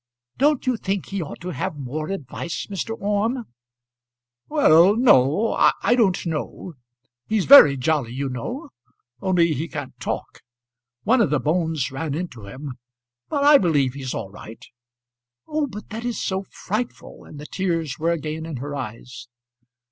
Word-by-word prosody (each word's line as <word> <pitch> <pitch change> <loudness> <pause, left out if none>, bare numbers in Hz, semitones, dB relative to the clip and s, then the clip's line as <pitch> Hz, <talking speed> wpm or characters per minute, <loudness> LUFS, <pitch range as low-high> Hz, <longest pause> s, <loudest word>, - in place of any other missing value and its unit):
"Don't 290 0 +3
you 255 -2 +1
think 195 -3 -3
he 195 -1 -3
ought 155 - -7
to 180 - -5
have 150 -1 -3
more 145 +3 -4
advice, 170 -2 -5
Mr. 215 +4 -4
Orme?" 210 +5 0 1.1
"Well, 195 - +5
no; 210 - +4
I - - +3
don't 200 -8 +2
know. 165 +2 -4 0.5
He's 215 -4 +1
very 150 - +9
jolly, 135 -3 0
you 135 +3 -3
know; 135 - -5 0.5
only 170 -3 +2
he 155 +4 -3
can't 145 -5 -6
talk. - - -5 0.6
One 240 +3 +4
of 205 - +3
the 150 -1 +1
bones 160 -3 0
ran 145 +1 -3
into 140 - -6
him, 130 +4 -8 0.5
but 285 -2 0
I 290 0 +8
believe 145 -8 +2
he's 135 -2 -5
all 95 - -5
right." 110 +2 -11 0.8
"Oh, 305 -1 -1
but 210 -4 -9
that 225 +2 -5
is 240 -3 -2
so 190 0 -2
frightful!" 220 +5 -5
and 150 - -12
the 150 - -8
tears 165 -6 -2
were 165 +2 +1
again 160 0 -3
in 160 - -5
her 145 +3 -5
eyes. 125 -1 -7
165 Hz, 155 wpm, -23 LUFS, 140-210 Hz, 1.1 s, very